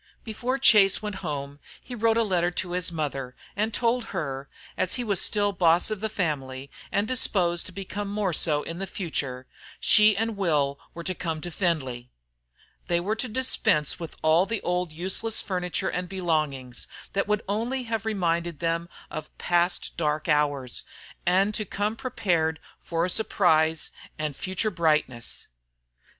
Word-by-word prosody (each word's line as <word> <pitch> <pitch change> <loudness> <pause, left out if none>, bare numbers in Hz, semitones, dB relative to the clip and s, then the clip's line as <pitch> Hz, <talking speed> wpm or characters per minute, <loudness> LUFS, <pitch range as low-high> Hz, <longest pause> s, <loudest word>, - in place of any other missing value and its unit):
Before 245 +4 -2
Chase 210 -7 +6
went 210 -2 -3
home 145 -4 -4 0.2
he 255 - -10
wrote 225 -1 +2
a 230 - +4
letter 180 -4 +2
to 175 0 -4
his 180 -1 +1
mother, 135 -5 -3 0.2
and 215 +3 0
told 235 +1 +1
her, 140 -7 -4 0.3
as 185 - +1
he 245 - -2
was 200 -5 +1
still 205 -1 +2
boss 175 +1 +3
of 215 - -2
the 220 - 0
family, 140 -9 -3 0.2
and 200 +2 +1
disposed 180 -9 +1
to - - -9
become 200 +2 -5
more 200 -3 -1
so 150 -2 +2
in 165 +1 -6
the 195 - -3
future, 140 -10 -3 0.3
she 210 -1 +6
and 225 +1 0
Will 150 -8 +1 0.2
were 170 - -6
to 185 - -1
come 165 -3 -3
to 175 - -5
Findlay. 130 -9 -1 0.8
They 170 -1 +2
were 200 +5 -1
to 250 - 0
dispense 215 - +2
with 165 -2 -6
all 160 +4 +4
the 225 0 -1
old 180 -1 0
useless 190 +7 -1
furniture 180 0 -2
and 180 0 -3
belongings, 155 -9 -1 0.3
that 195 - 0
would 210 0 +1
only 235 +6 -1
have 225 -2 -2
reminded 170 -6 0
them 170 +1 -1 0.2
of 155 0 -7
past 175 +1 +1
dark 155 -2 0
hours, 145 -5 +1 0.4
and 195 +4 +4
to 215 - -1
come 205 +2 -2
prepared 170 -10 0 0.2
for 165 -1 0
a - - 0
surprise 160 -6 +2 0.3
and 150 -2 -2
future 190 +6 -1
brightness. 155 - 0
175 Hz, 165 wpm, -26 LUFS, 155-205 Hz, 0.8 s, Chase